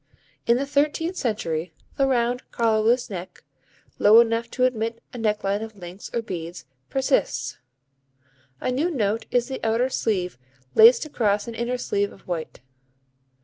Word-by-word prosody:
In 235 +1 +5
the 275 - -1
thirteenth 300 +5 0
century 175 - -2 0.2
the 275 - +2
round 245 -1 +1
collarless 230 +1 +2
neck, 180 -1 -7 0.6
low 215 +2 +8
enough 230 0 +2
to 250 - -1
admit 230 -2 -1
a 245 - -6
necklace 210 -2 0
of 220 -1 -7
links 180 +1 -9
or 235 - -2
beads, 175 - -6 0.2
persists. 265 - 0 1.0
A - - -1
new 290 +8 +1
note 225 - -1
is 245 -1 +1
the 265 -1 -6
outer 230 +3 +2
sleeve 185 - -1 0.3
laced 230 +7 +7
across 210 -7 0
an 235 - -5
inner 235 +2 -2
sleeve 205 -4 -1
of - - -16
white. 170 -3 -5
230 Hz, 145 wpm, -24 LUFS, 200-250 Hz, 1.0 s, low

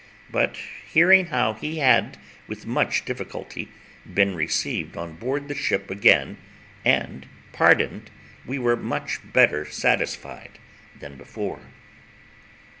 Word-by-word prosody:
But - - 0 0.3
hearing 185 +3 +6
how 125 -8 0
he 155 +9 -6
had 135 -4 +3 0.3
with - - -9
much - - 0
difficulty - - -7 0.4
been 100 -1 +2
received 80 -3 -2
on 85 -1 -7
board 135 - -4
the 145 - -4
ship 100 -8 -2
again 100 +1 +3 0.5
and 65 0 0 0.3
pardoned, - - +3 0.3
we 135 +3 -5
were 120 -2 +2
much 120 - -4
better 75 - +4
satisfied - - -2 0.4
than 70 -1 -12
before. 65 - -7
120 Hz, 115 wpm, -23 LUFS, 85-140 Hz, 0.5 s, hearing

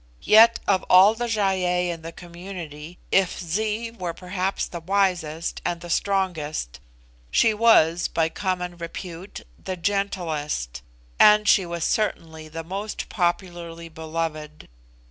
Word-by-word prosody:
Yet 225 +2 +7
of 195 -2 +3
all 190 +4 +7
the 240 +2 -3
Gy 225 -2 -1 0.2
ei 180 0 +1
in 165 -1 -7
the 165 +1 -7
community, 170 -2 -9
if 195 -2 +2
Zee 215 +6 -2
were 180 -7 -5
perhaps 185 +1 -2
the 170 - -7
wisest 175 -3 -1
and 170 - -2
the 175 0 -8
strongest, 165 - -1 0.5
she 225 -2 +3
was, 175 -7 +4
by 165 -1 0
common 180 0 -3
repute, 170 +2 -8 0.2
the 185 - -4
gentlest, 165 - -2 0.4
and 210 0 +6
she 190 -3 +4
was 170 -1 -4
certainly 160 -7 -2
the 165 +1 -7
most 195 +5 -5
popularly 175 -2 -3
beloved. 160 -1 -5
175 Hz, 130 wpm, -24 LUFS, 165-195 Hz, 0.5 s, Yet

